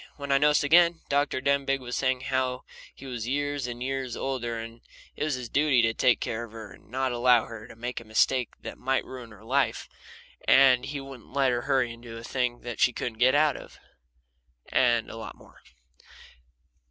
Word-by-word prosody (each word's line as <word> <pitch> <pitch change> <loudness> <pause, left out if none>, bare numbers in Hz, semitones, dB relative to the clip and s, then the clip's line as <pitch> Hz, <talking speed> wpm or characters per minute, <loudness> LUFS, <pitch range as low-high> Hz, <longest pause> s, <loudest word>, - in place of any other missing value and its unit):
When 140 -1 -5
I 135 - +5
noticed 150 +1 +4
again, 170 +2 +5
Dr. 140 -2 +1
Denbigh 140 0 +1
was 125 -2 -6
saying 130 -1 0
how 130 -1 -1 0.3
he - - -12
was 120 -4 -5
years 145 0 -1
and 120 0 -5
years 130 -2 -3
older, 120 -4 -3
and 115 +1 -8 0.3
it - - -3
was 150 -3 0
his 125 -2 -6
duty 140 -1 +3
to 115 0 +2
take 120 +1 +3
care 115 +1 -3
of 115 -2 -11
her 110 -3 -9
and - - -17
not 130 +2 -1
allow 120 -1 +4
her 115 -1 -9
to - - -13
make 120 +2 -5
a - - -12
mistake 115 +3 +1
that - - -8
might 135 +1 0
ruin 125 -3 -9
her 105 -1 -15
life, - - 0 0.6
and 130 -2 +6
he 140 +1 -4
wouldn't 135 -3 -11
let 135 -2 +3
her 120 0 0
hurry 130 -3 +1
into 115 -1 -10
a 115 - -9
thing 125 -1 -2 0.2
she 125 - +4
couldn't 115 -2 -5
get 130 +2 +5
out 150 -2 +4
of, - - -11 0.9
and 120 -3 +3
a - - -8
lot 115 - -8
more. - - -19
125 Hz, 200 wpm, -27 LUFS, 120-135 Hz, 0.9 s, and